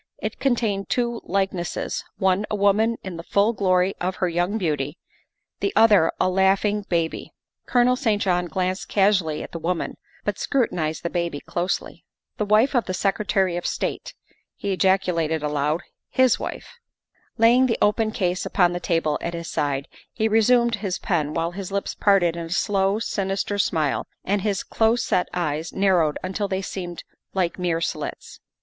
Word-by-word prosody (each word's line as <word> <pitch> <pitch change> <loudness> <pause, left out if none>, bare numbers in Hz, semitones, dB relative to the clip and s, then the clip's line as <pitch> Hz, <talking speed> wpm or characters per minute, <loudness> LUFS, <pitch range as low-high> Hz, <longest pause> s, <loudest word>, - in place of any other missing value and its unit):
It - - -5
contained 225 -7 0
two 235 -1 0
like 195 +1 0
nesses 175 -2 -3
one 190 +2 +1
a - - -1
woman 210 +3 +2
in 185 -3 -6
the - - -5
full 205 +3 +3
glory 185 -2 +2
of 185 +1 -1
her 185 - 0
young 175 +5 0
beauty, 150 -5 -2 0.6
the 400 - 0
other 205 -7 +6
a - - +3
laughing 195 +2 +2
baby. 165 -2 -2 0.3
Colonel 250 0 +4
St. 225 -6 +1
John 180 -3 +1
glanced 185 +3 -2
casually 190 -7 +2
at - - -9
the 165 - -5
woman, 170 +1 -2 0.3
but - - -2
scrutinized 170 - -1
the 170 - -2
baby 170 -4 -2
closely. 175 +4 -3 0.2
" - - -60
The 210 - 0
wife 215 +7 +4
of 245 -3 +2
the 185 - -3
Secretary 195 -2 +1
of 175 - -3
State," - - -3 0.4
he 200 -1 -2
ejaculated 180 -5 +1
aloud, 150 +2 0 0.2
" - - -63
his 260 -2 +3
wife." 480 - -7 0.6
Laying 240 +3 +5
the 230 - 0
open 215 +1 +2
case 180 -3 -1
upon 175 -3 +2
the 175 - -2
table 165 -4 0
at 170 0 -3
his 170 -1 -6
side, 140 -1 -1 0.2
he 220 -1 0
resumed 235 +2 +3
his 195 -3 -3
pen 155 -5 -1
while 165 +1 0
his 190 +1 -6
lips 200 0 -2
parted 190 -5 +3
in 170 -1 -4
a - - -12
slow, 195 +2 +1
sinister 200 -1 -2
smile 155 -7 0 0.2
and 200 +1 +1
his 200 -2 -1
close 225 +1 +1
set 180 - 0
eyes 160 -2 -2
narrowed 180 -6 +2
until 190 +2 -2
they 190 0 -2
seemed 175 -3 -6 0.3
like 180 -1 0
mere 170 -2 0
slits. - - -4
190 Hz, 175 wpm, -23 LUFS, 170-210 Hz, 0.6 s, other